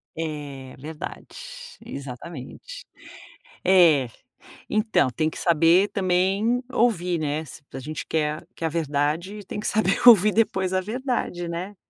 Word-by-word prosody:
É 145 -5 -6
verdade, 150 +3 -7 0.6
exatamente. 140 - -9 0.8
É, 165 -9 +5 0.6
então 215 - +2
tem 155 +6 -1
que - - -10
saber 170 +3 +4
também 195 +6 +1
ouvir, 180 -9 +1
né, 150 +1 -2
se 150 - -12
a - - -5
gente 155 +3 -6
quer 155 -1 -1
quer 165 - -4
a - - -2
verdade 160 +6 -1
tem - - -5
que 210 - -6
saber 210 -3 +1
ouvir 215 -3 +8
depois 190 -4 +1
a 185 - +2
verdade, 225 -6 -3
né. 180 +5 -5
170 Hz, 130 wpm, -24 LUFS, 150-200 Hz, 0.8 s, ouvir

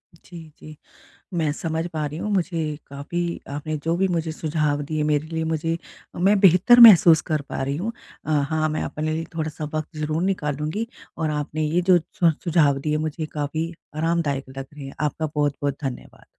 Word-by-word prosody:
जी, 170 +1 -13 0.2
जी। 155 0 -11 0.6
मैं 160 -3 +1
समझ 160 +2 -3
पा 155 -1 -2
रही 150 +2 -6
हूँ 210 - -3
मुझे 165 -5 -1
काफ़ी 170 +5 -4
आपने 150 +2 -3
जो 165 +1 +1
भी 190 +2 +2
मुझे 165 -3 -1
सुझाव 155 -2 -1
दिए 155 +1 -2
मेरे 150 0 +1
लिए 160 0 -3
मुझे 160 +1 -1 0.4
मैं 195 +4 +3
बेहतर 190 +6 +6
महसूस 180 -8 +9
कर 155 -1 +1
पा - - -3
रही 140 +1 -2
हूँ 210 +8 -3 0.3
अ, - - -3
हाँ 155 +1 +1
मैं 155 - -2
अपने 155 +1 -3
लिए 160 +1 -2
थोड़ा-सा 155 -1 -3
वक़्त 155 +1 -4
ज़रूर 155 +2 -1
निकालूँगी 155 +2 -1 0.3
और 160 -2 -1
आपने 150 +1 -2
ये 160 +4 +1
जो 180 - +7 0.2
स 165 -1 +6
सुझाव 155 -5 +3
दिए 150 +2 -1
मुझे 155 0 -3
काफ़ी 155 +3 -3 0.2
आरामदायक 155 -4 0
लग 135 0 -5
रहे 145 -2 -9
हैं, 135 - -8
आपका 150 +1 -1
बहुत-बहुत 145 -1 0
धन्यवाद। 130 -2 -6
155 Hz, 185 wpm, -23 LUFS, 150-170 Hz, 0.6 s, महसूस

